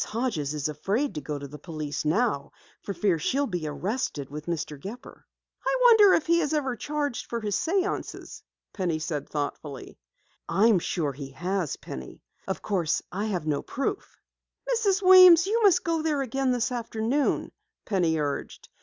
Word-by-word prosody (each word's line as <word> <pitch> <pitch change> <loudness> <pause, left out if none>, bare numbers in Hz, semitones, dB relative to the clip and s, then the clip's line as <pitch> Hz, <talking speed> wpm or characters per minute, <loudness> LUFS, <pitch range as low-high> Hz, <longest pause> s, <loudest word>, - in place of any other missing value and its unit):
Hodges 210 - -2
is 150 0 -1
afraid 200 - -1
to 150 - -5
go 145 +1 -4
to 140 0 -7
the 150 +2 -11
police 150 -3 -5
for 160 - -2
fear 175 -2 +1
she'll 275 - 0
be 175 - -3
arrested 150 - -3
with 150 +2 -7
Mr. 165 -3 -3
Gepper." 210 - -10 0.4
"I - - +1
wonder 440 -5 +8
if 325 - 0
he 340 0 +3
ever 295 -4 0
has 240 - -11
charged 290 -2 -3
for 235 - -3
his 210 -3 -2
séances?" 385 +3 -2 0.3
Penny 180 -5 -1
said 155 -2 -4
thoughtfully. 145 -2 -5 0.5
"I 200 - +3
am 205 -5 +4
sure 160 -4 -2
he 135 0 -8
has, 180 0 -2
Penny. 65 -1 -9 0.2
Of 190 - -4
course 180 -7 0
I 200 +4 -2
have 180 -7 -2
no 150 -2 0
proof." 275 - -4 0.5
"Mrs. 405 -4 +1
Weems, 365 -2 +9
you 450 +4 +1
must 365 -4 +5
go 330 -1 0
there 300 -3 0
again 265 +1 0
this 245 0 0
afternoon," 235 +3 -1 0.3
Penny 175 -5 +1
urged. 145 -2 -4
200 Hz, 165 wpm, -26 LUFS, -, 0.5 s, Weems